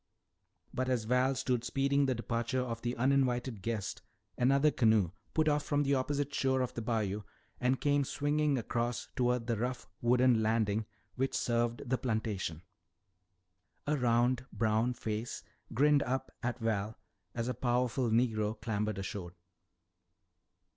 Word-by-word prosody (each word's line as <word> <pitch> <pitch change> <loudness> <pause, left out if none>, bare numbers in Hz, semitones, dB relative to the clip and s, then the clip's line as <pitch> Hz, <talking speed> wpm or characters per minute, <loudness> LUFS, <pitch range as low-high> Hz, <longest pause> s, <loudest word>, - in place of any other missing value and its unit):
But 130 +1 -1
as 125 -4 +1
Val 125 +4 +2
stood 130 -2 0
speeding 140 +3 +1
the 130 - +1
departure 120 +3 -1
of 115 -2 -4
the 120 0 -2
uninvited 125 -3 +1
guest, 110 -1 -3 0.3
another 140 +4 +4
canoe 110 - +3 0.2
put 155 -1 +3
off 150 -1 +3
from 145 0 +1
the 140 0 +1
opposite 140 +1 -1
shore 130 -2 +1
of 125 -1 -2
the 115 - -4
bayou 110 -3 -1 0.4
and 125 +1 +1
came 145 -1 +2
swinging 145 +1 +1
across 120 0 -2
toward 125 -1 +1
the 115 -2 -1
rough 125 +2 -3
wooden 125 -1 +4
landing 110 -1 +1 0.3
which 135 +1 0
served 120 0 0
the 130 +1 0
plantation. 105 -8 -2 1.2
A 150 - +1
round 125 0 +2
brown 115 +2 +1
face 110 +1 -4 0.3
grinned 145 +3 +4
up 130 +1 -2
at 120 0 -2
Val 110 -2 -1 0.4
as 115 0 -2
a 125 - 0
powerful 125 0 0
negro 110 -2 +1
clambered 105 -2 -2
ashore. 95 -2 -5
120 Hz, 140 wpm, -32 LUFS, 110-130 Hz, 1.2 s, another